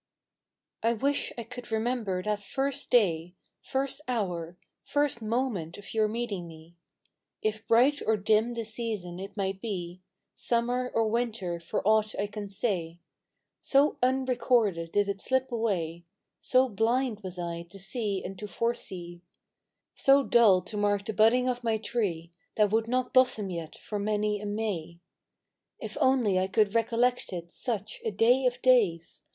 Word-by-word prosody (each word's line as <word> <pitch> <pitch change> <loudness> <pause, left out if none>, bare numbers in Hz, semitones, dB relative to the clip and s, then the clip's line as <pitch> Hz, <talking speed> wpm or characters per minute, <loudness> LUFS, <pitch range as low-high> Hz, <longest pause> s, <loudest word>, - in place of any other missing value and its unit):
T 230 +1 +3
WISH 280 +5 0
I 235 - -4
could 245 +1 -9
remember 220 -5 -1
that 210 0 -1
first 275 +6 -2
day, 180 -7 +2
" - - -50
L - - -49 0.2
First 270 +2 -2
hour, 180 -8 -2 0.3
first 290 -5 0
moment 220 -7 -2
of 205 - -9
your 220 -1 +3
meeting 210 -5 -3
me; 165 +1 -14 0.7
It 215 0 -1
bright 260 +6 +4
or 220 0 +3
dim 215 +4 +2
the 230 - -2
season, 215 -6 -3
it 195 +3 -8
might 195 -1 -2
be 180 -5 -5 0.3
Summer 245 +1 0
or 225 -1 +3
Winter 215 -6 -1
for 170 +3 -3
aught 215 0 +3
I 200 - +1
can 205 -1 -6
say; 180 -5 -2 0.6
So 280 +2 +3
unrecorded 245 -9 +1
did 205 0 +2
it 200 0 -3
slip 260 0 0
away, 175 -8 -1 0.4
So 255 +1 +3
blind 230 +1 0
was 185 -3 -7
I 170 -1 -4
to 195 - -12
see 200 0 -2
and 190 0 -7
to 210 - -5
foresee 180 -7 -4 0.4
— - - -58
So 275 +1 +7
dull 210 -8 +5
to 210 +3 -5
mark 205 -1 +1
the 220 - -3
budding 230 +4 +4
of 245 -1 -1
my 225 -2 +1
tree 190 -7 -2 0.2
That 210 -2 +3
would 225 +1 +1
not 250 +1 -1
blossom 235 -6 +3
yet 165 -2 -6
for 210 - -5
many 210 0 0
a 210 - -4
May. 195 -6 -3 0.8
If - - -6
only 240 -8 +3
I 185 - +1
could 210 0 +2
recollect 235 +2 +1
it, 170 -2 -6
such 215 -2 -3
A - - 0
day 240 +5 +3
of 245 0 -3
days 205 -11 +3
215 Hz, 165 wpm, -28 LUFS, 190-240 Hz, 0.8 s, So